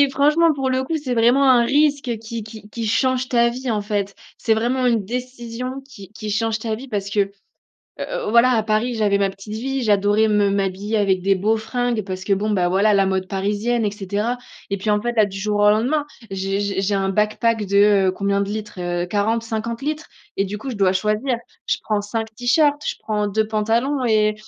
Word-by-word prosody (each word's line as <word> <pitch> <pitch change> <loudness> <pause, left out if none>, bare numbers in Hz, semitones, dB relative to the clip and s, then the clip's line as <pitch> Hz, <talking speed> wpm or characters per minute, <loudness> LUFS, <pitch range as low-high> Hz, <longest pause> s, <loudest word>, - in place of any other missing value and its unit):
et 280 - +3
franchement 305 +4 +3
pour 270 -2 -2
le 260 0 0
coup, 320 +4 -2
c'est 250 -3 -2
vraiment 240 +4 +4
un 245 -2 +6
risque 280 -4 +1
qui 225 0 -6
qui 215 -1 -11
qui 230 0 -4
change 255 +3 +1
ta 235 -1 +3
vie, 250 +1 -4
en 210 -2 0
fait! 205 -1 -2 0.2
C'est 225 - 0
vraiment 250 +3 0
une 230 -4 +2
décision 250 +2 -5
qui 200 -6 -13
qui 215 -1 -6
change 220 +1 0
ta 220 -1 -3
vie 260 +5 -8
parce 200 -4 -3
que, 205 0 0
heu 195 0 0 0.7
heu, - - -3
voilà, 235 +2 +5
à 220 -2 +2
Paris, 220 +3 0
j'avais 205 -2 +2
ma 200 -1 +2
petite 195 +2 -9
vie, 265 +3 -2
j'adorais 205 +1 +3
me 205 -1 +3
m'habiller 195 +2 -1
avec 195 -3 +2
des 195 +1 +2
beaux 215 +4 +1
fringues 240 0 -1
parce 185 -1 -6
que, 200 - 0
bon, 205 +2 0
bah, 180 -4 +2
voilà, 205 +3 +3
la 195 -1 +4
mode 190 -1 -1
parisienne 210 +4 -1
et 205 - +1
cetera 210 +4 -2 0.3
et 200 - -1
puis, 210 - -5
en 210 - +2
fait, 240 0 -1
là, 215 - +6
du 195 -1 -7
jour 205 +1 -1
au 205 - +6
lendemain, 260 +8 +2 0.2
j'ai 195 +1 -2
j'ai 200 -1 -1
j'ai 200 +1 0
un 195 0 0
backpack. 215 +1 +1
de, 200 0 +4
heu, - - +1
combien 200 +1 0
de 200 - -1
litres? 210 -3 -5
Heu, 175 0 -1
40-50 225 +4 -2
litres 305 +1 -3 0.3
et 195 - +1
du 205 +2 -5
coup 265 +4 -6
je 235 - -5
dois 190 -2 +3
choisir, 215 +6 0 0.3
je - - +1
prends 210 -1 0
5 220 +2 -4
tee-shirts, 290 +5 +2
je - - -1
prends 210 -1 -1
2 215 +2 0
pantalons 230 +6 0
et 215 -1 +3
215 Hz, 225 wpm, -21 LUFS, 200-240 Hz, 0.7 s, un